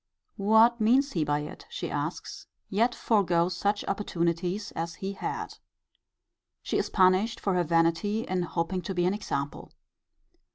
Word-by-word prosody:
What 220 +3 +4
means 265 +6 +4
he 165 - 0
by 145 0 0
it, 150 - -9
she - - -5
asks, - - -4 0.2
yet 230 +5 +2
forego 175 -6 +2
such 200 +3 -1
opportunities 180 0 -1
as 165 0 -4
he 195 +1 -4
had? - - -5 1.0
She - - 0
is - - -1
punished 190 +4 +3
for 195 - 0
her 180 -1 +2
vanity 165 +6 +1
in 185 -4 -1
hoping 175 +1 -2
to 190 +1 -5
be 175 0 +1
an 185 - +2
example. 145 -9 -4
185 Hz, 150 wpm, -28 LUFS, 170-210 Hz, 1.0 s, What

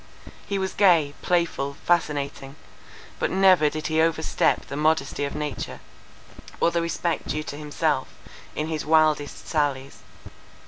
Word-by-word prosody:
He 200 - -1
was 190 -1 -2
gay, 170 -8 +4
playful, 165 -6 0
fascinating—but 145 -4 -3
never 185 -5 +5
did 155 +1 -6
he 155 0 +2
overstep 160 -1 +1
the - - -7
modesty 150 -2 +1
of 140 - -5
nature, 150 -1 -4 0.8
or 170 - +3
the 170 - 0
respect 170 0 -2
due 155 +2 -2
to 145 - -7
himself, 150 0 -1 0.5
in 150 - -1
his 160 -1 -3
wildest 155 -2 +2
sallies. 140 -3 -1
155 Hz, 130 wpm, -24 LUFS, 145-170 Hz, 0.8 s, never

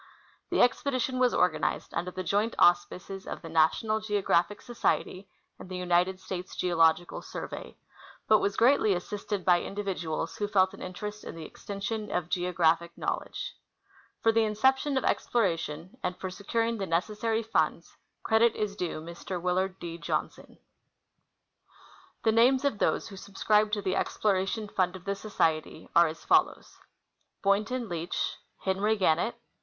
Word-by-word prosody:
The - - +4
expedition 255 0 0
was 250 -1 +4
organized 180 -3 0
under 180 - -2
the 185 +1 -5
joint 205 +5 0
auspices 180 +2 +2
of - - -6
the 165 - -7
National 165 +7 +2
Geographic 205 -2 +1
Society 200 -5 -1 0.3
and - - -10
the 185 - -4
United 180 +1 +1
States 185 -1 -6
Geological 170 -1 +2
Survey, - - -7 0.5
but 215 - +6
was 200 0 -1
greatly 230 -5 +4
assisted 200 +2 -4
by 175 -1 +5
individuals 185 -6 -3
who 205 - -1
felt 190 -2 +3
an - - -11
in 185 - -6
terest 210 +3 -6
in - - -7
the 165 -1 -7
extension 205 +4 -5
of 175 -2 -2
geographic 170 -2 +1
knowledge. - - -3 0.7
For 225 - +5
the 225 - +2
incep 220 +5 +3
tion 285 -1 -1
of 265 - 0
exploration 170 -5 -1
and 180 -3 -2
for 185 - -5
securing 225 +4 -1
the 195 - -2
necessary 215 +6 0
funds, 170 -6 -1 0.3
credit 225 +1 +4
is 210 -1 -2
due 175 -5 -3
Mr. 170 +2 -6
Willard 185 +2 0
D. 170 -1 -7
Johnson. - - -4 1.7
The 220 - +4
names 255 +5 +4
of 235 -8 0
those - - +1
who 195 - -10
subscribed 210 +2 +1
to 205 -2 0
the 185 -1 0
exploration 205 +1 0
fund 185 -2 0
of 185 0 -11
the 200 - 0
Society 165 -6 -1
are 170 0 +7
as 160 +1 -8
follows: - - +2 0.6
Boynton 215 +5 +1
Leach. 170 -1 -3 0.3
Henry 200 +3 +1
Gannett. 190 +4 +2
195 Hz, 150 wpm, -29 LUFS, 175-215 Hz, 1.7 s, are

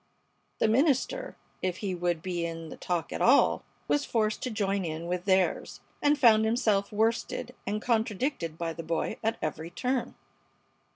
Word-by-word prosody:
The - - +3
minister, 285 - +1 0.3
if 185 -1 -1
he 195 -2 -2
would 175 -2 -1
be 175 -2 -2
in 165 -1 -5
the - - -8
talk 175 -4 -2
at - - -4
all, 270 +4 +5 0.3
was 290 - +2
forced 215 -2 0
to 255 - -2
join 200 -3 0
in 160 0 -4
with 180 +1 -2
theirs, 190 -2 +1 0.2
and 290 0 +4
found 225 -5 +6
himself 220 -3 +1
worsted 225 +3 0
and 210 +1 0
contradicted 220 - 0
by 165 -1 -2
the 165 - -6
boy 165 0 -2
at 225 +1 0
every 155 +2 -3
turn. 250 +8 -2
200 Hz, 165 wpm, -29 LUFS, 170-235 Hz, 0.3 s, found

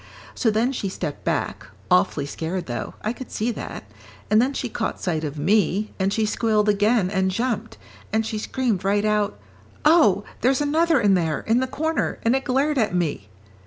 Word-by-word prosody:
So 230 - +1
then 225 +4 +1
she 210 -7 -3
stepped 150 -5 -5
back, - - -2 0.2
awfully 115 +10 +3
scared 165 +5 -4
though, 120 -1 -5
I 215 - -1
could 255 0 -9
see 225 +3 -1
that, - - -7 0.5
and 215 +1 +6
then 260 +3 +1
she 270 - -3
caught 225 -1 -3
sight 160 -4 -1
of 150 0 -4
me, 205 +4 +1
and 190 +1 +1
she 220 +1 +1
squealed 215 -1 +1
again 205 -1 +2
and 190 -1 +1
jumped, 230 +2 -2 0.3
and 220 +1 +1
she 215 -1 -3
screamed 225 -4 -1
right 205 +2 +1
out, 210 - 0 0.5
'Oh, 300 - +5 0.2
there's 260 +2 +3
another 310 +1 +2
in 205 -3 +4
there, 165 -4 0
in 225 +2 +2
the 260 - 0
corner, 315 +3 -1
and 230 +3 +3
it 270 - -1
glared 275 +2 +1
at 215 -5 +1
me.' 150 - -2
215 Hz, 190 wpm, -23 LUFS, 190-250 Hz, 0.5 s, and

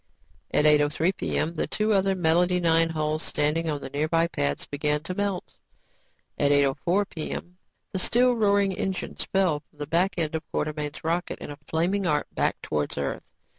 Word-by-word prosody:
At 150 - +3
8:03 150 +4 +3
p.m., 160 -2 -1
the 160 - -2
two 215 0 +1
other 195 -1 +2
Melody 175 +1 +3
Mix 165 -1 +3
hulls 155 0 -1
standing 155 +3 0
on 145 -2 -2
nearby 155 +4 +1
pads, 70 - -2
began 150 +1 -1
to 185 - -4
melt. 200 -1 -3 0.9
At 145 0 +3
8:04 145 +8 +2
p.m., 175 +2 -6 0.4
the 190 - -1
still 245 +6 +4
roaring 200 -3 +3
engine 190 0 -3
fell 185 -6 0
from 145 - -33
the 145 - -4
back 175 +5 +1
end 160 -2 0
of 160 - -1
Quartermain's 150 -1 -3
rocket 170 +3 -1
in - - -8
a 145 - -10
flaming 180 +4 0
arc 150 -2 +1
back - - 0
towards 75 -1 -2
Earth. 70 -1 -3
165 Hz, 170 wpm, -26 LUFS, 150-185 Hz, 0.9 s, still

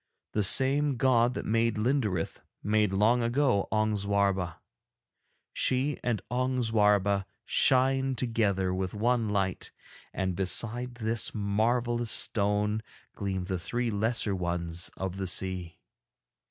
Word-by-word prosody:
The 105 - 0
same 135 +6 +4
god 125 -1 +2
that - - -4
made 115 +1 +1
Linderith 105 - -1 0.2
made 105 -1 +1
long 110 +5 +2
ago 120 -3 +1
Ong 110 0 +1
Zwarba; 100 -3 0 1.0
she 130 +2 0
and 115 -6 -1
Ong 130 0 0
Zwarba 105 -3 +2 0.2
shine 135 0 +2
together 105 -6 0
with 95 +1 -3
one 115 +1 +1
light, 95 -3 -2 0.4
and 95 -2 -2
beside 115 +6 0
this 115 -2 -1
marvellous 120 +3 0
stone 105 0 +2 0.3
gleam 95 -3 -3
the 95 -1 -3
three 120 +6 -2
lesser 110 0 +1
ones 85 -1 -3
of 95 0 -4
the 95 -1 -3
sea. 90 -2 -3
105 Hz, 120 wpm, -28 LUFS, 95-120 Hz, 1.0 s, same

